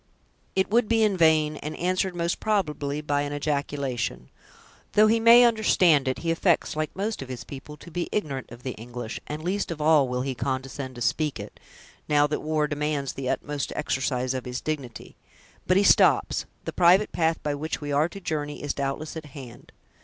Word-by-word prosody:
"It 190 Hz, +1 st, +1 dB
would 235 Hz, 0 st, +3 dB
be 225 Hz, 0 st, +3 dB
in 210 Hz, -2 st, +2 dB
vain; 155 Hz, -3 st, +3 dB
and 150 Hz, +2 st, -6 dB
answered, 185 Hz, +1 st, 0 dB
most 170 Hz, 0 st, -1 dB
probably, 150 Hz, -9 st, -1 dB
by 145 Hz, -1 st, 0 dB
an 145 Hz, 0 st, -3 dB
ejaculation. 140 Hz, -4 st, -2 dB, 0.6 s
Though 215 Hz, -, +6 dB
he 225 Hz, +1 st, +3 dB
may 230 Hz, +2 st, +8 dB
understand 185 Hz, -, +4 dB
it, 130 Hz, -, 0 dB
he 165 Hz, -, +2 dB
affects, 165 Hz, -1 st, +1 dB
like 155 Hz, 0 st, -1 dB
most 205 Hz, +1 st, -3 dB
of 135 Hz, -, -8 dB
his 125 Hz, -2 st, -6 dB
people, 140 Hz, +4 st, -10 dB
to 170 Hz, -, -13 dB
be 175 Hz, +1 st, -3 dB
ignorant 140 Hz, -, -3 dB
of 120 Hz, +1 st, -12 dB
the 130 Hz, -, -3 dB
English; 120 Hz, 0 st, -7 dB
and 150 Hz, +1 st, -5 dB
least 195 Hz, +3 st, -1 dB
of 165 Hz, -2 st, -5 dB
all 150 Hz, -2 st, +4 dB
will 125 Hz, 0 st, -2 dB
he 135 Hz, 0 st, -2 dB
condescend 130 Hz, +1 st, -4 dB
to 120 Hz, -, -9 dB
speak 150 Hz, +1 st, 0 dB
it, 100 Hz, +1 st, -9 dB, 0.5 s
now 145 Hz, -1 st, +4 dB
that 150 Hz, +1 st, -1 dB
the -, -, -9 dB
war 155 Hz, 0 st, 0 dB
demands 145 Hz, -2 st, -2 dB
the 130 Hz, -2 st, -4 dB
utmost 145 Hz, +1 st, -2 dB
exercise 130 Hz, -3 st, -1 dB
of 130 Hz, -1 st, -4 dB
his 125 Hz, 0 st, -4 dB
dignity. 140 Hz, -7 st, -6 dB, 0.5 s
But 185 Hz, -, +4 dB
he 200 Hz, -, +4 dB
stops; -, -, +4 dB, 0.2 s
the -, -, -4 dB
private 185 Hz, +4 st, +4 dB
path 160 Hz, -1 st, +1 dB
by 150 Hz, -, -1 dB
which 150 Hz, +2 st, -3 dB
we 145 Hz, -1 st, -5 dB
are 150 Hz, +4 st, +2 dB
to 195 Hz, -, -9 dB
journey 150 Hz, -5 st, -4 dB
is, 145 Hz, -, -1 dB
doubtless, 140 Hz, +3 st, -3 dB
at 160 Hz, -1 st, -6 dB
hand." 125 Hz, -4 st, -11 dB
150 Hz, 200 wpm, -26 LUFS, 135-170 Hz, 0.6 s, may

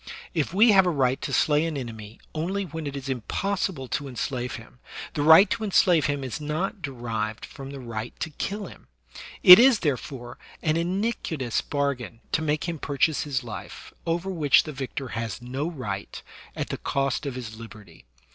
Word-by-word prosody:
If 155 Hz, -3 st, 0 dB
we 215 Hz, +5 st, +6 dB
have 190 Hz, -2 st, +6 dB
a -, -, +4 dB
right 135 Hz, -5 st, +1 dB
to -, -, -4 dB
slay 150 Hz, 0 st, +3 dB
an 165 Hz, -3 st, -2 dB
enemy 110 Hz, -4 st, -8 dB
only 185 Hz, +6 st, -2 dB
when 160 Hz, -3 st, -6 dB
it 140 Hz, 0 st, -4 dB
is 135 Hz, 0 st, -7 dB
impossible 140 Hz, -, -2 dB
to 145 Hz, -, -2 dB
enslave 125 Hz, -1 st, -3 dB
him, 120 Hz, +2 st, -13 dB, 0.3 s
the 145 Hz, -, -1 dB
right 160 Hz, +7 st, +8 dB
to 230 Hz, -1 st, -1 dB
enslave 180 Hz, -6 st, +4 dB
him 145 Hz, -2 st, -2 dB
is 130 Hz, +3 st, -5 dB
not 155 Hz, +7 st, -2 dB
derived 115 Hz, -7 st, -4 dB
from 135 Hz, -2 st, -10 dB
the 140 Hz, 0 st, -7 dB
right 115 Hz, -2 st, -6 dB
to 160 Hz, -, -3 dB
kill 200 Hz, +7 st, -4 dB
him; -, -, -13 dB, 0.6 s
it 180 Hz, +2 st, +12 dB
is, 250 Hz, -2 st, +6 dB
therefore, 130 Hz, -4 st, -3 dB, 0.2 s
an 155 Hz, -1 st, +2 dB
iniquitous 170 Hz, -, -1 dB
bar 140 Hz, -1 st, 0 dB
gain 120 Hz, -3 st, -10 dB
to 160 Hz, -, +1 dB
make 150 Hz, -1 st, 0 dB
him 165 Hz, -2 st, -3 dB
purchase 145 Hz, +3 st, +1 dB
his 135 Hz, -3 st, -2 dB
life, 110 Hz, -3 st, -9 dB
over 170 Hz, +3 st, -1 dB
which 150 Hz, -7 st, +4 dB
the 155 Hz, -, -7 dB
victor 135 Hz, -1 st, -5 dB
has 115 Hz, +1 st, -4 dB
no 130 Hz, +6 st, -3 dB
right, 105 Hz, -, -6 dB, 0.3 s
at -, -, -3 dB
the -, -, -4 dB
cost 140 Hz, +1 st, -1 dB
of 135 Hz, -, -4 dB
his 115 Hz, -3 st, -6 dB
liberty. 110 Hz, -2 st, -13 dB
145 Hz, 185 wpm, -26 LUFS, 125-165 Hz, 0.6 s, it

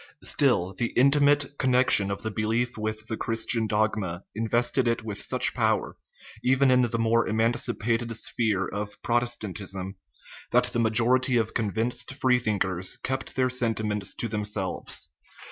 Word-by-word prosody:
Still, 90 Hz, +2 st, +1 dB
the 120 Hz, +4 st, -2 dB
intimate 145 Hz, +1 st, +3 dB
connection 125 Hz, -6 st, +3 dB
of 100 Hz, -, -4 dB
the 110 Hz, -, -3 dB
belief 115 Hz, +3 st, -1 dB
with 110 Hz, 0 st, -4 dB
the 110 Hz, -, -4 dB
Chris 115 Hz, 0 st, -2 dB
tian 115 Hz, -3 st, +1 dB
dogma 105 Hz, -5 st, -1 dB
invested 120 Hz, +3 st, +1 dB
it 115 Hz, -1 st, 0 dB
with 105 Hz, -2 st, -2 dB
such -, -, +2 dB
power, -, -, 0 dB, 0.5 s
even 130 Hz, +1 st, +3 dB
in 125 Hz, 0 st, +5 dB
the 120 Hz, -1 st, 0 dB
more 115 Hz, 0 st, +2 dB
emancipated 115 Hz, 0 st, 0 dB
sphere 105 Hz, -5 st, 0 dB
of 105 Hz, 0 st, -6 dB
Protestantism, 105 Hz, -5 st, -2 dB, 0.5 s
that 125 Hz, -, +3 dB
the 120 Hz, -, 0 dB
majority 120 Hz, +3 st, +3 dB
of 115 Hz, -1 st, -1 dB
convinced 120 Hz, +4 st, -2 dB
free 130 Hz, -2 st, +2 dB
thinkers 95 Hz, -5 st, -1 dB
kept 130 Hz, 0 st, -4 dB
their 130 Hz, -1 st, +1 dB
senti 115 Hz, -3 st, 0 dB
ments 105 Hz, -2 st, -2 dB
to 115 Hz, -, -3 dB
themselves. 105 Hz, -4 st, -3 dB
115 Hz, 145 wpm, -26 LUFS, 105-125 Hz, 0.5 s, in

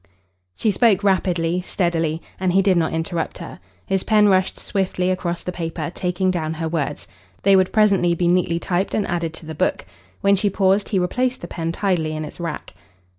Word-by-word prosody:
She 215 Hz, -, +1 dB
spoke 205 Hz, -2 st, +3 dB
rapidly, 180 Hz, -3 st, +1 dB
steadily, 165 Hz, -3 st, -1 dB, 0.2 s
and 185 Hz, -1 st, +1 dB
he 195 Hz, +1 st, +4 dB
did 190 Hz, -1 st, +3 dB
not 165 Hz, -2 st, +1 dB
interrupt 165 Hz, +1 st, -3 dB
her. -, -, -9 dB, 0.3 s
His 195 Hz, -1 st, 0 dB
pen 210 Hz, 0 st, +4 dB
rushed 190 Hz, -1 st, +2 dB
swiftly 185 Hz, -1 st, -1 dB
across 175 Hz, -2 st, -2 dB
the 180 Hz, -, -3 dB
paper, 165 Hz, -1 st, -4 dB
taking 185 Hz, +1 st, 0 dB
down 160 Hz, -3 st, -2 dB
her 165 Hz, 0 st, -3 dB
words. 150 Hz, -3 st, -3 dB, 0.4 s
They 195 Hz, -, +6 dB
would 185 Hz, -1 st, +3 dB
presently 195 Hz, -5 st, +3 dB
be 175 Hz, +1 st, 0 dB
neatly 175 Hz, -1 st, +2 dB
typed 180 Hz, +3 st, -1 dB
and 210 Hz, -, +1 dB
added 170 Hz, -2 st, -2 dB
to -, -, -9 dB
the 160 Hz, -, -6 dB
book. 150 Hz, -, -1 dB, 0.4 s
When 200 Hz, 0 st, +4 dB
she 205 Hz, +1 st, +1 dB
paused, 195 Hz, +1 st, +2 dB
he 205 Hz, -, 0 dB
replaced 250 Hz, +8 st, 0 dB
the 175 Hz, -, -6 dB
pen 165 Hz, -1 st, -3 dB
tidily 170 Hz, -4 st, -1 dB
in 155 Hz, 0 st, -4 dB
its -, -, -10 dB
rack. 165 Hz, -3 st, -5 dB
180 Hz, 195 wpm, -21 LUFS, 165-195 Hz, 0.4 s, They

